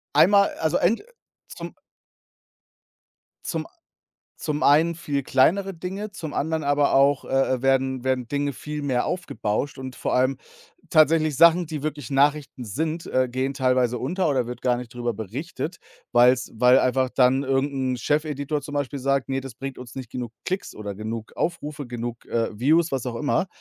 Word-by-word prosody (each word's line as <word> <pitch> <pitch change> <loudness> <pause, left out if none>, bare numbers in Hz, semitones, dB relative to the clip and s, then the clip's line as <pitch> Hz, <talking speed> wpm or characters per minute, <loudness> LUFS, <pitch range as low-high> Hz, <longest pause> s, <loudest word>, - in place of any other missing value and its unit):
einmal 200 +3 +6
also, 160 -1 0
ent 225 - +1 0.4
zum - - -8 1.7
zum 160 -2 -3 0.7
zum 150 -1 -3
einen 160 +4 +5
viel 145 -4 -2
kleinere 190 +10 +2
Dinge, 195 +5 -5
zum 160 -5 -6
anderen 160 +1 -1
aber 145 0 +2
auch, 140 0 +3
äh, - - -12 0.3
äh, - - -10
werden 130 -1 +1
werden 130 -2 0
Dinge 145 +2 -2
viel 150 +3 -5
mehr 130 -4 0
aufgebauscht. 140 - -2
Und 130 -1 -7
vor - - -2
allem 130 +1 +2 0.5
tatsächlich 155 -2 +4
Sachen, 170 +1 +6
die 155 -2 -5
wirklich 145 -4 -4
Nachrichten 140 -1 +1
sind, 160 - -3
äh, 130 0 +1
gehen 130 +2 -1
teilweise 125 -2 +1
unter 170 +6 0
oder 130 -4 +1
wird 125 +1 -7
gar 125 -1 +2
nicht 125 -1 -9
drüber 120 -1 -2
berichtet, 135 - -5 0.4
weil's 125 +2 +4
weil 125 +3 +5
einfach 130 0 +1
dann 130 +1 +3
irgend 135 +1 0
'n 130 -1 -1
Chefeditor 150 +1 -1
zum 145 - -8
Beispiel 140 -1 -2
sagt: 135 0 0
„Ne, 135 0 -1
das 135 -3 -8
bringt 135 +2 -6
uns 125 -2 -10
nicht 130 -3 -7
genug 120 -2 -5
Klicks 185 +1 -3
oder 105 -1 -6
genug 110 +2 -6
Aufrufe, 150 -4 -3
genug, 120 -1 -5
äh, 115 -1 -1
Views“, 160 +7 +3
was 135 -2 -1
auch 125 -2 -4
immer, 145 +7 0
135 Hz, 170 wpm, -24 LUFS, 125-155 Hz, 1.7 s, einmal